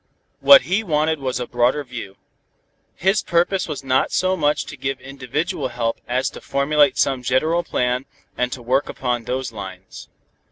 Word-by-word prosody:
What 140 -2 +8
he 185 - 0
wanted 155 -3 +1
was 130 -3 -2
a 125 - -2
broader 125 +5 +1
view. 120 -7 -8 0.8
His 190 +3 +2
purpose 175 +2 +1
was 150 -4 -5
not 130 -1 +1
so 185 +1 +1
much 150 -4 +1
to - - -8
give 135 0 -3
individual 135 +2 -3
help 120 -2 -3
as 130 +2 0
to - - -11
formulate 145 +1 +2
some 135 -2 +1
general 155 +8 +1
plan 125 -3 -1 0.3
and 125 0 -1
to 125 -2 -6
work 130 +4 +1
upon 120 -3 -2
those 125 0 -3
lines. 95 -3 -9
135 Hz, 165 wpm, -21 LUFS, 125-150 Hz, 0.8 s, What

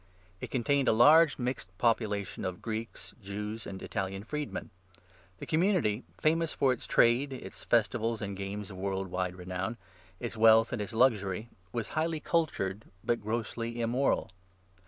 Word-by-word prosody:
It - - -6
contained 135 +2 +1
a - - +5
large, 150 +7 +7
mixed 120 -8 -4
population 110 -3 0
of 95 -1 -3
Greeks, 115 0 -5
Jews, 105 +3 -5
and 95 - -6
Italian 95 +1 -3
freedmen. 150 +5 -4 0.7
The - - -7
community 160 - +2
— - - -32
famous 165 +1 +2
for 135 -2 +3
its 120 - -8
trade, 125 +4 +4
its 130 - -8
festivals 115 0 +1
and 100 -1 -4
games 100 +1 -5
of 95 - -9
world 95 0 -2
wide 90 0 -2
renown, 90 +5 -4 0.4
its 120 -1 -4
wealth 115 +2 +6
and 115 - -2
its 105 - -5
luxury 110 -3 +2
— 90 0 -34
was 115 0 -3
highly 160 0 -1
cultured, 115 - -1 0.2
but 120 -2 0
grossly 115 +2 -3
immoral. 120 -1 +1
115 Hz, 155 wpm, -30 LUFS, 100-125 Hz, 0.7 s, large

